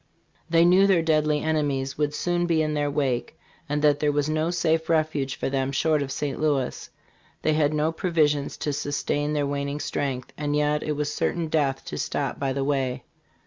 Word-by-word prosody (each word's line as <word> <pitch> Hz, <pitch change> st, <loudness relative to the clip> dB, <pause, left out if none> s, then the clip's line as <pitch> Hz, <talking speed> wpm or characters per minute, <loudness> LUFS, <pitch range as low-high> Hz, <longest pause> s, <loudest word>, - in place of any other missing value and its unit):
They 165 Hz, 0 st, +5 dB
knew 185 Hz, +3 st, +6 dB
their 180 Hz, -4 st, +3 dB
deadly 155 Hz, -2 st, +2 dB
enemies 145 Hz, -4 st, -1 dB
would 150 Hz, 0 st, -1 dB
soon 175 Hz, +1 st, 0 dB
be 160 Hz, -2 st, +2 dB
in 155 Hz, 0 st, -1 dB
their 145 Hz, -1 st, 0 dB
wake, 135 Hz, -4 st, -1 dB, 0.3 s
and 150 Hz, +1 st, -1 dB
that 145 Hz, -1 st, +4 dB
there 150 Hz, 0 st, +2 dB
was 145 Hz, 0 st, 0 dB
no 155 Hz, +1 st, 0 dB
safe 165 Hz, -2 st, 0 dB
refuge 155 Hz, -4 st, +1 dB
for -, -, -3 dB
them 135 Hz, 0 st, -1 dB
short 155 Hz, +2 st, +1 dB
of 135 Hz, -1 st, -3 dB
St. 145 Hz, 0 st, -3 dB
Louis. 145 Hz, -5 st, -1 dB, 0.5 s
They 155 Hz, -, +3 dB
had 150 Hz, -1 st, +2 dB
no 155 Hz, +1 st, +1 dB
provisions 155 Hz, -4 st, 0 dB
to 145 Hz, -, 0 dB
sustain 145 Hz, +1 st, -1 dB
their 145 Hz, -1 st, +1 dB
waning 140 Hz, +1 st, -2 dB
strength, 135 Hz, -4 st, -3 dB
and 145 Hz, -1 st, -1 dB
yet 150 Hz, 0 st, +1 dB
it 150 Hz, -, -2 dB
was 145 Hz, 0 st, -2 dB
cer -, -, 0 dB
tain 165 Hz, -2 st, -3 dB
death 140 Hz, -4 st, 0 dB
to -, -, -5 dB
stop -, -, -2 dB
by 135 Hz, -1 st, 0 dB
the 135 Hz, +1 st, -1 dB
way. 130 Hz, -3 st, -1 dB
150 Hz, 200 wpm, -25 LUFS, 140-155 Hz, 0.5 s, knew